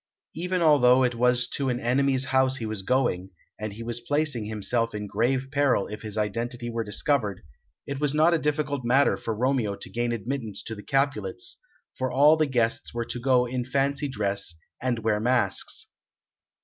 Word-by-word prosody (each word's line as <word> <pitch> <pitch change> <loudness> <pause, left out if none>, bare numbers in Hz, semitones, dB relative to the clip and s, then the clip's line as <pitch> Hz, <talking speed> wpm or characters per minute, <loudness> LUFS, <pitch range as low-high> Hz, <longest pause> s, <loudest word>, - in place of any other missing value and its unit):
Even 180 +2 -1
although 130 -5 +6
it 125 -1 +2
was 125 +1 +2
to 135 -2 -1
an 125 -1 -1
enemy's 130 +2 +1
house 130 0 +3
he 115 - -4
was 110 -2 -3
going, 95 -5 0 0.3
and 110 -1 -4
he 115 +3 -8
was 120 0 -3
placing 145 -2 -1
himself 110 +2 -1
in 105 0 -4
grave 130 +5 0
peril 140 -8 +2
if 105 0 -7
his 110 -1 -5
identity 120 +3 -2
were 115 0 -2
discovered, 105 - 0 0.4
it 140 -1 -4
was 145 -1 +1
not 155 +3 +4
a 165 - +2
difficult 150 -3 -1
matter 130 +4 +3
for 115 - -4
Romeo 125 -4 +1
to - - -8
gain 120 0 -1
admittance 115 -1 -4
to 115 - -5
the 105 - -8
Capulets, 140 - -1 0.4
for 130 0 -2
all 145 +4 +6
the 155 -1 +1
guests 120 -3 0
were 120 0 -1
to 120 - -5
go 125 0 +3
in 125 0 -2
fancy 140 +3 0
dress, 100 -7 -2 0.3
and 125 -1 0
wear 110 -1 +2
masks. 120 -4 0
125 Hz, 185 wpm, -26 LUFS, 115-140 Hz, 0.4 s, although